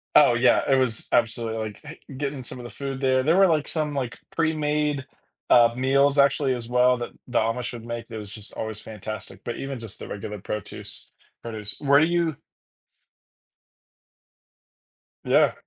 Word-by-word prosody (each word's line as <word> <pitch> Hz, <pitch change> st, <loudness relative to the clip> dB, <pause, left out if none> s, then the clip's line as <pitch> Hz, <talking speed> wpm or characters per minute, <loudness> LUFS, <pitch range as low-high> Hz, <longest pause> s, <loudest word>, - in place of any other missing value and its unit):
Oh -, -, +7 dB
yeah, -, -, +4 dB
it 135 Hz, -, +6 dB
was 125 Hz, -4 st, 0 dB
absolutely, 115 Hz, 0 st, +1 dB
like 105 Hz, -, -8 dB
eh, 150 Hz, -, -8 dB, 0.2 s
getting 140 Hz, -2 st, -3 dB
some 125 Hz, -, -8 dB
of 120 Hz, -, -8 dB
the -, -, -7 dB
food 135 Hz, -1 st, -5 dB
there 130 Hz, -1 st, +3 dB
there 160 Hz, +5 st, +3 dB
were, 195 Hz, 0 st, +6 dB
like, 155 Hz, -3 st, +1 dB
some, 155 Hz, -2 st, -1 dB
like, 125 Hz, -3 st, -3 dB
pre-made, 150 Hz, -3 st, 0 dB, 0.4 s
uh, 120 Hz, -1 st, +6 dB
meals 140 Hz, +2 st, +3 dB
actually 140 Hz, -1 st, +4 dB
as 115 Hz, -1 st, -3 dB
well 125 Hz, 0 st, +4 dB
that 120 Hz, -, -5 dB, 0.2 s
the 125 Hz, -, +1 dB
Amish 115 Hz, +2 st, -1 dB
would 115 Hz, -1 st, -8 dB
make. 120 Hz, 0 st, -5 dB
It 110 Hz, -, -6 dB
was 105 Hz, -2 st, -7 dB
just 105 Hz, 0 st, -10 dB
always 110 Hz, -1 st, -4 dB
fantastic, 110 Hz, -1 st, -8 dB
but 120 Hz, -, -4 dB
even 135 Hz, -2 st, -5 dB
just 115 Hz, -3 st, -7 dB
the -, -, -7 dB
regular 105 Hz, +1 st, -6 dB
protuce 105 Hz, +1 st, -6 dB, 0.3 s
produce. 110 Hz, -3 st, -5 dB
Where 140 Hz, -1 st, +5 dB
do 155 Hz, -, +5 dB
you 170 Hz, -4 st, 0 dB, 2.9 s
Yeah. -, -, +4 dB
125 Hz, 170 wpm, -25 LUFS, 115-140 Hz, 2.9 s, Oh